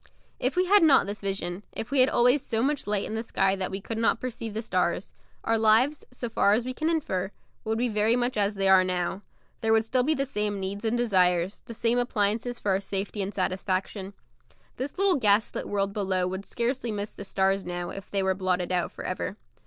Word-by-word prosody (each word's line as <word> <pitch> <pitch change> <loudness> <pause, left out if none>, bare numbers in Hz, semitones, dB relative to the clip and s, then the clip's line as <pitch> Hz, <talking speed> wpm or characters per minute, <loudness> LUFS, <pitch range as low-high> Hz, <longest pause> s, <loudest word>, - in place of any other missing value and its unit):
If - - 0
we 365 +1 +3
had 405 +3 +5
not 310 -5 +6
this 205 +1 -5
vision, 195 -2 -3
if 225 - -5
we 280 - +2
had 255 +2 +6
always 250 +2 +3
so 225 +1 -1
much 285 -2 -1
light 205 -1 0
in - - -5
the 220 - -1
sky 195 -4 +1
that 190 -1 -3
we 195 - -4
could 225 +3 -5
not 230 - +2
perceive 230 -3 -5
the 220 - -2
stars, 180 -2 -1 0.3
our 225 0 +1
lives, 225 +7 +4
so 250 -1 -5
far 205 -3 +3
as 230 +3 +1
we 255 - -3
can 310 +5 -1
infer, 190 - -1 0.4
would 220 0 0
be 245 +2 +1
very 215 +1 +2
much 245 +1 0
as 205 0 +1
they 195 0 +1
are 190 -1 +7
now; 185 +1 -1 0.4
there 225 -1 0
would 225 0 +4
still 255 +2 +1
be 310 +5 +1
the 275 - -1
same 210 -5 -2
needs 200 +3 -4
and 225 +2 +1
desires, 185 -5 +2
the 230 - -7
same 235 +2 +1
appliances 235 +1 0
for 205 - -1
our 190 - +2
safety 200 +1 -3
and 195 +1 -2
satisfaction; 190 +1 -2 0.6
this 270 +6 -5
little 390 -3 +3
gaslit 210 -3 +2
world 200 -1 -1
below 190 -3 0
would 190 +2 -5
scarcely 240 0 -2
miss 205 0 -4
the - - -8
stars 195 0 +1
now, 175 0 -4
if 195 +1 -9
they 195 -1 0
were 190 0 +2
blotted 185 -1 -1
out 180 -1 0
for - - -9
ever. 185 +2 -3
210 Hz, 225 wpm, -27 LUFS, 190-240 Hz, 0.6 s, are